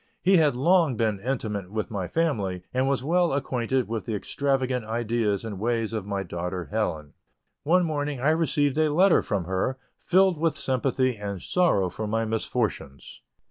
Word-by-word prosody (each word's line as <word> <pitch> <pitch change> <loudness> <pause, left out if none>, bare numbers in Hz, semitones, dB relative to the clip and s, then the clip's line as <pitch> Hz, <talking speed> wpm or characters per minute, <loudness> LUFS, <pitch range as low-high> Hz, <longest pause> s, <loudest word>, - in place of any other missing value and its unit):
He 190 +1 +5
had 150 -5 +3
long 160 -1 +3
been 110 -3 0
intimate 105 -5 -3
with 110 +1 -3
my 95 -4 -3
family, 100 - -1
and 130 +1 +1
was 135 -3 0
well 170 +1 +2
acquainted 130 -2 -1
with 115 +1 -4
the 110 - -1
extravagant 130 +2 -1
ideas 110 -2 -1
and 105 -4 -6
ways 115 0 -1
of 105 -3 -4
my 100 -1 -2
daughter 90 0 -5
Helen. 80 -9 -2 0.5
One 175 +4 +3
morning, 145 -3 -2
I 140 +5 +3
received 155 -3 +1
a 155 -1 +3
letter 180 +4 +5
from 100 -6 -2
her, 95 +9 -1 0.2
filled 185 -2 +3
with 165 0 +1
sympathy 130 -1 0
and 100 -2 -5
sorrow 165 - +2
for 100 +5 -5
my 115 +2 0
misfortunes. 110 - -3
120 Hz, 170 wpm, -26 LUFS, 105-145 Hz, 0.5 s, He